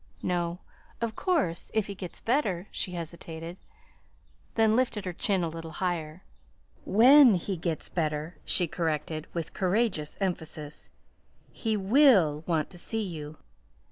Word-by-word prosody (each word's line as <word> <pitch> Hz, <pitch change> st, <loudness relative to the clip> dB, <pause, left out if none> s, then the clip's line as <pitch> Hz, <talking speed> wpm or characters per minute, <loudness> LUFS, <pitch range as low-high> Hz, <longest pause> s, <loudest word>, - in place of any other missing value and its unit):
"No. 175 Hz, -1 st, -1 dB, 0.4 s
Of 230 Hz, -2 st, -2 dB
course, 290 Hz, -, 0 dB
if 220 Hz, -2 st, +2 dB
he 200 Hz, -, -5 dB
gets 185 Hz, -3 st, -8 dB
better 215 Hz, -8 st, 0 dB
" -, -, -34 dB
She 180 Hz, -, -3 dB
hesitated; 165 Hz, 0 st, -6 dB, 1.0 s
then 220 Hz, -1 st, +4 dB
lifted 230 Hz, -5 st, 0 dB
her 180 Hz, -, -3 dB
chin 195 Hz, -1 st, +1 dB
a -, -, 0 dB
little 165 Hz, 0 st, -7 dB
higher; 170 Hz, -2 st, -3 dB, 0.6 s
"WHEN 250 Hz, +2 st, +7 dB
he 185 Hz, +2 st, -2 dB
gets 165 Hz, -2 st, -3 dB
better," 155 Hz, 0 st, -2 dB
she 180 Hz, -, +2 dB
corrected 155 Hz, -2 st, -2 dB
with 165 Hz, -2 st, -4 dB
courageous 185 Hz, -5 st, 0 dB
emphasis, 160 Hz, -6 st, -4 dB, 0.6 s
"he 220 Hz, -1 st, -1 dB
will 195 Hz, -, +5 dB
want 160 Hz, -4 st, 0 dB
to 175 Hz, -, -10 dB
see 225 Hz, +4 st, -3 dB
you." 155 Hz, -5 st, -6 dB
180 Hz, 140 wpm, -28 LUFS, 160-215 Hz, 1.0 s, WHEN